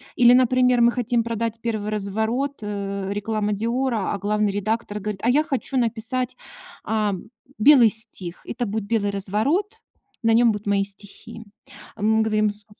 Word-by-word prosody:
Или, 245 -2 +6
например, 250 -1 +4
мы 235 0 +5
хотим 240 -1 0
продать 230 0 -3
1 215 -3 -2
разворот, 220 +7 -2
э, 200 -1 -4
реклама 210 0 -1
"Диора", 235 0 -1
а - - -2
главный 210 0 0
редактор 210 +1 -2
говорит: 205 -1 -5
"А 235 - +2
я 295 +5 +4
хочу 275 -3 -3
написать, 240 +2 -1 0.5
а-а, 215 -3 0 0.4
белый 250 -2 +7
стих. 205 -6 -2
Это 240 +1 -3
будет 215 +1 -3
белый 205 -2 0
разворот, 270 - -1 0.4
на 225 - +3
нём 235 0 +5
будут 205 0 -6
мои 200 -1 +2
стихи". 200 +3 -8 0.5
Мы 220 +2 +2
говорим: 215 -1 +1
"Су" 205 0 -11
220 Hz, 155 wpm, -23 LUFS, 205-240 Hz, 0.5 s, белый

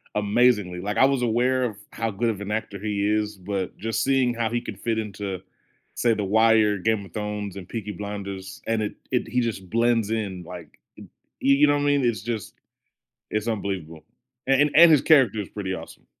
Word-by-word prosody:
amazingly, 105 -3 +2
like, 105 +3 -3
I - - +6
was 135 -2 +1
aware 125 +2 +1
of 115 -4 -2 0.2
how 115 -1 -2
good 115 +4 0
of 105 -3 -3
an 100 - -6
actor 105 -2 -3
he 100 -1 -1
is, 105 0 0
but 95 0 -4
just 115 +1 -2
seeing 130 -2 +2
how 115 -1 -1
he 120 +1 -1
could 100 -4 -8
fit 115 -1 -1
into, 100 -3 -4 0.5
say, 120 -1 +2
The 105 -2 -2
Wire, 110 0 +4
Game 105 +1 0
of - - -16
Thrones, 105 -2 -4
and 95 -2 -8
Peaky 105 -3 -5
Blinders, 100 -1 -7
and 115 -1 0
it 105 - -2 0.2
it 125 -3 0
he 125 +2 0
just 105 -6 -4
blends 115 -1 +2
in, 100 -5 -3
like, 85 -3 -11 0.2
m - - -10 0.4
you 140 +1 +5
you 150 +1 +5
know 145 - +4
what 145 - 0
I - - 0
mean? 145 -2 +2
It's 120 -2 0
just 110 -3 -4 0.8
it's 105 +2 -2
unbelievable, 95 -7 -4 0.4
a - - +4
and 145 0 +4
and 170 0 +9
his 150 - +5
character 135 -9 +4
is 100 - -6
pretty 95 -3 -4
awesome. - - -10
110 Hz, 210 wpm, -24 LUFS, 100-120 Hz, 0.8 s, and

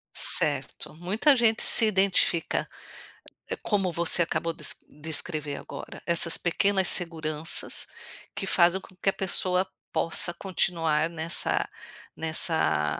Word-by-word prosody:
Certo, - - -1
muita 210 - +1
gente 225 -2 +2
se 225 - +6
identifica. 190 -4 +1 0.9
Como 195 -4 -1
você 170 +1 +3
acabou 165 0 -3
de - - -12 0.3
descrever 150 -1 -2
agora, - - -10
essas 170 -1 +3
pequenas 190 +2 +1
seguranças, 160 -2 -1 0.5
que 195 - -4
fazem 175 0 +3
com 185 - -17
que 190 - 0
a - - -2
pessoa 185 0 0 0.3
possa 170 +1 +3
continuar 165 -4 -2
nessa 165 0 -1 0.5
nessa 80 - 0
170 Hz, 110 wpm, -25 LUFS, 160-190 Hz, 0.9 s, se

